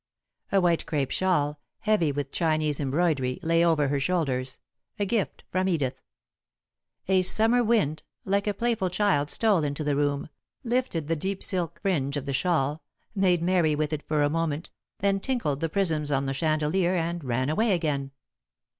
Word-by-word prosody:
A 195 - +4
white 175 -3 +1
crêpe 140 -4 -1
shawl, 150 -6 +1 0.2
heavy 210 -8 +2
with 140 -1 -4
Chinese 155 -3 0
embroidery, 140 -2 0
lay 165 +1 +3
over 160 -4 +3
her 140 0 0
shoulders, 135 -5 -1 0.4
a 205 - 0
gift 205 0 -2
from 185 +1 +1
Edith. 145 -8 -1 1.1
A 190 0 +4
Summer 225 +6 +3
wind, 205 -10 +1 0.2
like 200 +1 0
a 205 - +1
playful 230 -4 0
child, 180 -6 +1
stole 205 -5 +2
into 145 +1 -2
the 145 -1 0
room, 145 0 0 0.3
lifted 240 - -1
the 165 - +1
deep 190 +5 -3
silk 180 -4 -1
fringe 145 -8 0
of 140 - -4
the 140 - -3
shawl, 150 0 0 0.3
made 185 -5 +2
merry 170 -4 +2
with 155 0 -1
it 150 - -2
for 150 -1 +1
a - - +4
moment, 165 -1 -2 0.3
then 195 0 +2
tinkled 195 - -1
the 165 - -1
prisms 160 -5 0
on 135 0 +1
the 135 - -1
chandelier 155 +5 +1
and 170 -1 -2
ran 130 0 -1
away 215 +9 +2
again. 150 -6 0
165 Hz, 170 wpm, -26 LUFS, 145-190 Hz, 1.1 s, A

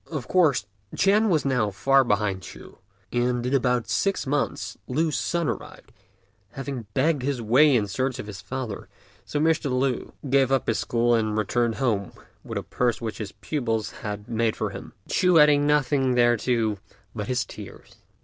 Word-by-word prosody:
Of 145 -7 -5
course 155 - +3 0.3
Ch'ên 210 +3 +3
was 160 -6 +1
now 125 -6 +1
far 135 +8 +3
behind 105 -4 0
Ch'u; - - -12 0.3
and 120 0 0
in 125 - -1
about 125 -3 +1
six 195 -1 0
months 140 +1 -2
Lü's 155 +4 0
son 170 -2 -1
arrived, 115 - -6 0.6
having 135 -4 -6
begged 145 +1 +2
his 135 0 -1
way 130 +6 +4
in 110 -4 +2
search 130 +7 -2
of 130 - -6
his 100 -4 -8
father, 115 +1 -6 0.4
so 145 - -2
Mr. 160 -1 +1
Lü 130 0 -1 0.2
gave 135 0 +3
up 135 -2 +2
his 115 - 0
school 120 0 +1
and 110 -2 +1
returned 115 +2 0
home 110 -7 -1 0.3
with - - -5
a - - -3
purse 120 -2 -1
which 115 -1 -5
his 105 -3 -5
pupils 115 0 -2
had 105 -1 -5
made 115 -1 0
up - - -19
for - - -1
him, - - -9
Ch'u 180 -2 +3
adding 145 -1 +5
nothing 135 -3 +2
thereto 120 -3 +2 0.3
but 105 -2 -5
his 125 0 0
tears. - - -12
125 Hz, 175 wpm, -25 LUFS, 110-140 Hz, 0.6 s, adding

